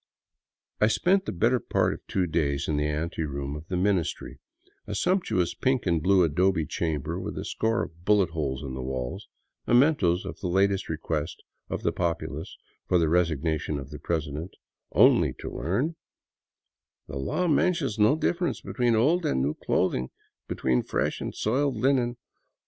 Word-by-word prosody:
I 105 - +5
spent 190 - +2
the - - -2
better 120 +8 +2
part - - +1
of - - -8
two 95 -2 0
days 75 -4 0
in 75 - 0
the 75 0 +1
anteroom 75 -2 -3
of 75 +2 -9
the 90 - -2
Ministry, 95 -2 -1 0.5
a 105 - -4
sumptuous 95 - +1
pink 130 -2 0
and 85 -3 +1
blue 95 +2 +4
adobe 85 +1 +2
chamber 75 -2 -2
with - - -5
a - - -4
score 110 0 0
of 85 +1 -10
bullet 100 -4 +3
holes 70 -4 -2
in 65 -2 -5
the 65 - -4
walls 65 -1 -4 0.2
— - - -48
mementoes 120 - +3
of - - -7
the 95 - -3
latest 95 +2 +1
request 80 -1 -3 0.3
of - - -4
the - - +2
populace 80 -1 -3 0.3
for 90 - +3
the 80 -2 +2
resignation 80 -3 0
of 70 +1 -7
the 75 - -7
president 75 +1 -3 0.2
— - - -55
only - - +4
to - - -8
learn: 130 - -1 0.6
'' - - -61
The 70 - -6
law 125 - -1
mentions 155 - +1
no 105 +7 +5
difference 175 +2 0
between 120 -2 0
old 155 +11 +3
and 110 - +1
new 70 +2 0
clothing; 65 -4 0 0.4
be - - -3
tween 65 -2 +1
fresh - - -2
and - - -4
soiled 130 +3 0
linen. 125 0 +1
85 Hz, 175 wpm, -27 LUFS, 75-115 Hz, 0.6 s, I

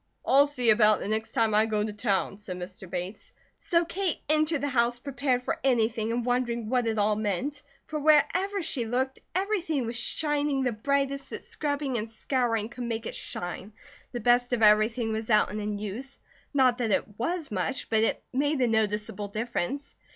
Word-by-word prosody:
"I'll 280 +2 +6
see 250 -5 +3
about 215 -1 +5
it - - -10
the - - -4
next 220 +1 -2
time 225 -2 +2
I 215 +1 +4
go 210 -1 0
to 210 -1 -3
town," 200 -2 0
said 185 -3 -5
Mr. 185 +1 -8
Bates; 180 +4 -5 0.3
so 345 -3 +1
Kate 370 0 -1
entered 310 -1 +2
the 285 - 0
house 240 -2 +2
prepared 255 -1 -1
for 330 +5 -2
anything 230 -3 +1
and 235 0 -1
wondering 240 -2 -1
what 250 -2 +1
it 225 -1 0
all 210 +1 +3
meant 215 +7 -2 0.2
for 310 -1 -4
wherever 315 +7 +3
she 255 -7 -2
looked 260 +3 -1 0.2
everything 365 - 0
was 230 +1 -2
shining 290 0 +1
the 250 - +1
brightest 275 +4 -1
that - - -7
scrubbing 285 -4 -2
and 220 +1 -5
scouring 230 -1 -1
could 245 0 -6
make 230 -1 -3
it - - -4
shine, 180 +4 -5 0.4
the 245 - -4
best 245 +2 +3
of 230 -2 +1
everything 220 +2 +4
was 220 +1 -4
out 215 -1 +4
and 210 0 -4
in 210 0 -2
use; 215 +7 -6 0.3
not 255 -3 +3
that 235 -2 0
it 210 +1 -1
was 330 +5 -2
much, 265 - -1
but 220 -1 +4
it - - 0
made 290 +2 +1
a 250 - +3
noticeable 210 -2 -1
difference. 235 +5 -3
240 Hz, 195 wpm, -27 LUFS, 215-280 Hz, 0.4 s, I'll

